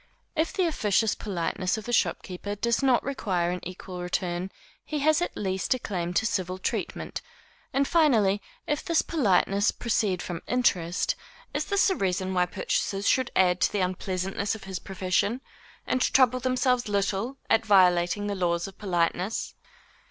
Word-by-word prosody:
If 320 0 +1
the 370 - +1
officious 220 - +2
politeness 185 0 -2
of 220 - -7
the 240 - -3
shopkeeper 205 -2 -1
does 235 +4 0
not 260 -3 +3
require 185 -10 -1
an 180 - -3
equal 180 0 -7
return, 180 0 -2 0.3
he 305 - -4
has 310 +3 +3
at 350 - -2
least 190 +4 0
a - - -2
claim 180 -7 -3
to 220 - +2
civil 185 -3 -1
treatment; 185 - -3 0.5
and, 275 0 +1
finally, 225 - +3 0.2
if 295 0 -1
this 335 -2 +2
politeness 205 - +2
proceed 210 -6 0
from 175 -2 -5
interest, 180 -9 +1 0.4
is - - -1
this 400 -1 +3
a - - +1
reason 185 - -1
why 180 -1 +2
purchasers 195 +2 -1
should 260 -2 +3
add 180 -1 +3
to - - +3
the 205 - 0
unpleasantness 185 +2 -2
of 220 - -10
his 190 -1 -5
profession, 195 +4 -1 0.5
and 255 - 0
trouble 255 -1 +4
themselves 255 -2 +1
little 200 +5 -1
at 225 - +3
violating 185 -1 +4
the 205 - -1
laws 175 -2 0
of 195 0 -13
politeness? 180 +1 -1
200 Hz, 160 wpm, -27 LUFS, 185-245 Hz, 0.5 s, trouble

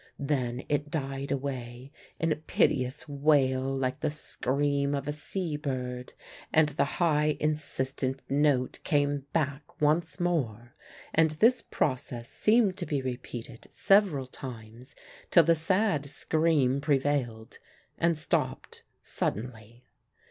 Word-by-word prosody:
Then 130 -3 -1
it 145 0 -1
died 135 -2 -3
away 130 -2 -4 0.3
in 165 0 +1
a - - +3
piteous 135 -2 0
wail 140 -2 +3
like 135 -1 -1
the 155 - 0
scream 140 -1 -1
of 140 0 -4
a 150 - -1
sea 155 +1 -3
bird, 125 -4 -4 0.4
and 155 -1 +4
the 150 - +1
high 150 -3 +2
insistent 135 -3 -1
note 140 -2 +1
came 145 -1 +1
back 145 -2 -2
once 155 +4 +1
more, 120 -10 -1 0.4
and 160 0 +4
this 225 +11 +3
process 125 -3 -2
seemed 215 -4 +3
to 175 - -4
be 145 - 0
repeated 125 -2 -6
several 195 -9 +3
times 120 -1 -10 0.3
till 170 - +7
the 165 +2 +4
sad 165 -2 +1
scream 145 -3 +1
prevailed, 135 -6 -1 0.4
and 170 -1 +2
stopped 155 - -1 0.2
suddenly. 115 +1 -4
140 Hz, 120 wpm, -29 LUFS, 130-155 Hz, 0.4 s, till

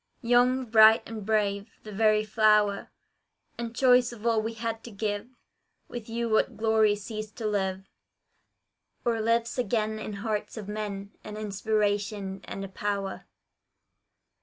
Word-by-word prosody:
Young, 245 +2 +3
bright 220 0 +6
and 220 -2 -6
brave, 205 0 0
the 215 - -9
very 215 +1 +3
flower 210 -2 +3 0.7
And 235 0 -5
choice 250 -1 +4
of 235 -2 -11
all 225 -2 +3
we 225 +1 -4
had 225 0 -4
to - - -7
give, 205 +1 -3 0.6
With 235 -2 -8
you 235 +1 -2
what 220 -1 +1
glory 220 -1 +3
ceased 215 +1 -7
to 230 - -6
live, 190 -2 -1 1.2
Or 230 -2 +1
lives 230 +2 +1
again 220 -2 0
in 215 - -5
hearts 210 +2 -3
of 210 -3 -6
men. 205 -1 -5
An 210 0 -7
inspiration 205 -1 -1
and 195 - -6
a - - -6
power! 200 0 -4
215 Hz, 140 wpm, -28 LUFS, 205-230 Hz, 1.2 s, bright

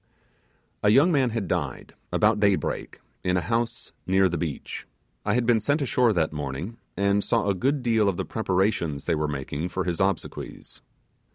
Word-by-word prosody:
A 105 - +4
young 140 +11 +6
man 135 -5 +3
had 110 -4 -2
died, - - -3 0.2
about - - +3
daybreak, 100 -2 0 0.2
in 90 0 +2
a - - +1
house 115 +2 -2 0.2
near 95 +1 +4
the 85 - -2
beach. 80 -5 -4 0.4
I 105 +1 +1
had 125 -1 +2
been 115 -1 +4
sent 145 +8 +1
ashore 125 -3 +3
that 80 -6 +1
morning, 75 - -5 0.2
and 100 0 +2
saw 115 -3 +1
a 100 - +3
good 135 +8 0
deal 110 -4 +3
of 90 - -2
the - - -2
preparations 95 -8 0
they - - +1
were 75 -1 0
making 70 +4 -3
for 95 - -2
his 90 0 -2
obsequies. 95 0 -3
100 Hz, 180 wpm, -26 LUFS, 90-115 Hz, 0.4 s, young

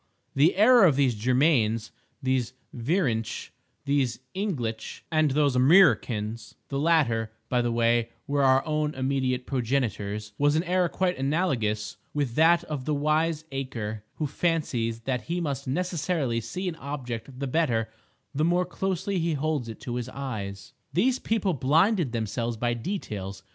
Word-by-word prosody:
The 150 +6 +4
error 220 +2 +7
of 155 -6 +4
these 135 -3 +3
Jurmains, 115 -1 +2 0.3
these 130 -2 0 0.2
Vrinch, 120 - -1 0.3
these 140 -4 +1
Inglitch, 130 - -3
and 155 -1 +3
these 140 -1 +2
Amriccans 120 - +3
(the 140 - -2
latter, 135 -9 +2 0.2
by 125 -1 +2
the 120 0 0
way, 115 0 +2 0.2
were 145 -1 0
our 135 +1 +4
own 155 -1 -1
immediate 130 -1 -1
progenitors), 110 -5 -2
was 145 +1 +3
an 160 - +2
error 180 0 +1
quite 180 -2 -1
analogous 130 - 0 0.2
with 140 -5 -1
that 165 +5 +4
of 145 -4 -5
the 150 - 0
wiseacre 145 -8 -1
who 155 - -2
fancies 135 -8 -1
that 125 -1 -2
he 175 +1 0
must 140 -5 -3
necessarily 155 -5 -1
see 180 - -4
an 165 -2 -3
object 130 -3 -6
the 140 - -2
better 125 -6 +1 0.5
the 150 - 0
more 175 +2 +2
closely 190 +1 -2
he 165 0 0
holds 145 -4 -1
it 110 - -8
to 125 -3 -4
his 125 0 -4
eyes. 100 -8 -6 0.2
These 245 +8 +2
people 210 -4 0
blinded 160 - +2
themselves 115 +1 -2
by 120 +1 0
details. 105 - -5
135 Hz, 150 wpm, -27 LUFS, 115-160 Hz, 0.5 s, error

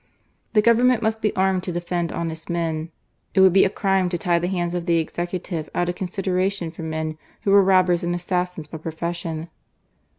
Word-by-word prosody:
The 210 -2 +4
Government 235 +1 +4
must 220 0 0
be 210 - +2
armed 190 -1 +2
to 180 - -4
defend 175 -1 -2
honest 160 -1 -5
men. 165 -2 -2 0.5
It 190 - +6
would 190 -2 +7
be 195 - +6
a - - +2
crime 195 -2 +1
to 175 - -1
tie 170 0 +1
the 175 - -1
hands 175 -2 -1
of 175 0 -3
the 170 -1 +3
Executive 170 0 -3
out 175 0 +1
of - - 0
consideration 185 -1 -1
for 165 - -10
men 160 -1 -3 0.2
who 200 - +2
were 200 0 +8
robbers 185 -2 +3
and 175 0 0
assassins 180 -2 -2
by 155 +1 -8
profession." 165 0 -4
175 Hz, 195 wpm, -23 LUFS, 170-190 Hz, 0.5 s, were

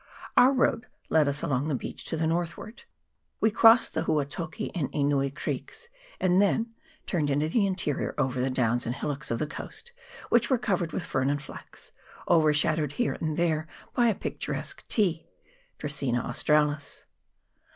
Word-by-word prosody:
Our 255 +2 +7
road 250 -2 +1 0.2
led 155 -2 +4
us 140 0 -1
along 135 +1 0
the 150 - 0
beach - - -6
to 160 - -3
the 160 - 0
north 170 +1 -1
ward. 230 - -11 0.5
We 220 - +3
crossed 225 +2 +6
the - - -1
Huatoki 155 +2 -2
and 160 -7 -2
Enui 140 -1 +1
creeks, 460 - -6 0.3
and 185 +1 +3
then 225 +3 +1 0.3
turned 155 -6 0
into 145 +2 +1
the 200 +3 +2
interior 180 -7 -2
over 130 -3 0
the 130 - +1
downs 120 -2 0
and 120 - -2
hillocks 145 0 -3
of 115 - 0
the 150 - -1
coast, 470 - -8 0.4
which 235 0 +3
were 260 - +4
covered 190 -7 -1
with 180 - -3
fern 130 +1 0
and 145 0 0
flax, 150 - -12 0.4
overshadowed 155 -2 +3
here 140 -2 0
and 155 -1 -1
there 160 -2 +1 0.3
by 240 -1 +3
a 220 - +2
picturesque - - -5
ti 175 -7 0 0.5
(Dracaena 135 -5 -1
australis). 150 +3 0
155 Hz, 165 wpm, -27 LUFS, 140-190 Hz, 0.5 s, Our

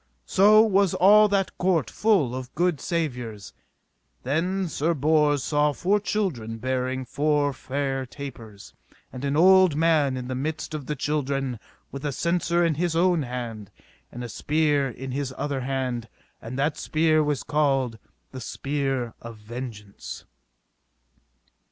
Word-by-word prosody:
So 210 +3 +6
was 200 -4 +2
all 210 +3 +7
that 195 -2 0
court 180 -5 +2
full 195 - +2
of 130 -1 -7
good 175 -4 +1
savours. 125 - -3 0.7
Then 180 +8 0
Sir 165 +2 0
Bors 150 -1 +2
saw 150 0 +2
four 200 +7 +1
children 160 - -2
bearing 130 +2 -2
four 145 +1 +1
fair 135 0 -3
tapers, 120 -7 -10 0.4
and 125 - -7
an 140 +1 0
old 185 -1 +6
man 155 -4 +2
in 125 -1 -5
the 130 - -3
midst 155 +5 -4
of 150 -4 -5
the 150 - -2
children 135 -3 -2 0.3
with 140 0 -7
a 145 - -1
censer 170 +3 +1
in 165 - +2
his 165 +2 -1
own 175 -1 +3
hand, 120 -5 -5 0.4
and 120 - -7
a 120 - -6
spear 145 +2 +1
in 130 +2 -7
his 135 0 -3
other 145 -2 -2
hand, 125 -3 -3 0.3
and 120 +3 -7
that 145 +2 0
spear 155 0 +2
was 145 -2 -1
called 135 -6 0 0.3
the 130 - -8
Spear 135 -2 -2
of 115 -1 -9
Vengeance. 105 -2 -8
145 Hz, 145 wpm, -25 LUFS, 130-165 Hz, 0.7 s, all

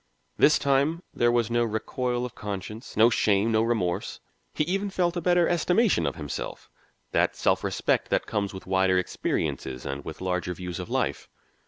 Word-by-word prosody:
This 150 - +5
time 140 +5 +1
there 120 0 +3
was 120 -1 +1
no 120 0 +3
recoil 120 +3 -2
of 125 - -7
conscience, 105 +2 -7
no 115 +2 +6
shame, 105 0 +2
no 110 0 +3
remorse; 110 -7 -1 0.3
he - - 0
even 195 +5 -1
felt 180 -2 0
a 175 - -1
better 175 0 +3
estimation 180 +6 +2
of - - -2
himself, 75 -4 -6 0.4
that - - +2
self - - +1
respect - - 0
that - - +1
comes 100 -1 -2
with 95 - -9
wider 95 0 +2
experiences 65 -7 -2
and 70 0 -4
with 80 - -8
larger 90 -1 -2
views 90 -1 -6
of - - -6
life. - - -1
115 Hz, 175 wpm, -26 LUFS, 95-145 Hz, 0.4 s, no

